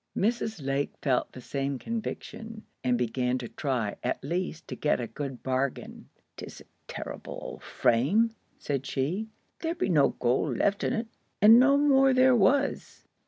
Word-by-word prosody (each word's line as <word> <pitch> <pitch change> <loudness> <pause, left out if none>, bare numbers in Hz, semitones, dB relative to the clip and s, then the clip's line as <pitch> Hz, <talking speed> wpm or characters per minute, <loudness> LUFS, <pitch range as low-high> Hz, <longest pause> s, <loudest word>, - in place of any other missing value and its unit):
Mrs. 220 - -1
Lake 135 +1 -1
felt 130 -4 +1
the 130 - -10
same 140 +2 -3
conviction, 225 - -6 0.2
and 125 -1 +2
began 125 +1 0
to 125 -2 -6
try 125 -8 -2
at - - -2
least 170 +1 -3
to - - -4
get 150 - +1
a 120 - -2
good 130 +3 -6
bargain. 130 0 -3 0.3
"'Tis - - -9
a - - -16 0.2
terr'ble - - -7
old - - -8
frame," 185 - +2 0.3
said 135 -2 -3
she. 170 +11 -2 0.3
"There 330 0 -2
be 325 - -1
no 150 -6 +4
gold 125 +1 +1
left 200 0 +1
on't." 230 -1 -1 0.3
And 225 +3 +8
no 275 +2 +5
more 270 -2 +4
there 255 0 +5
was. 270 +6 +1
155 Hz, 160 wpm, -28 LUFS, -, 0.3 s, And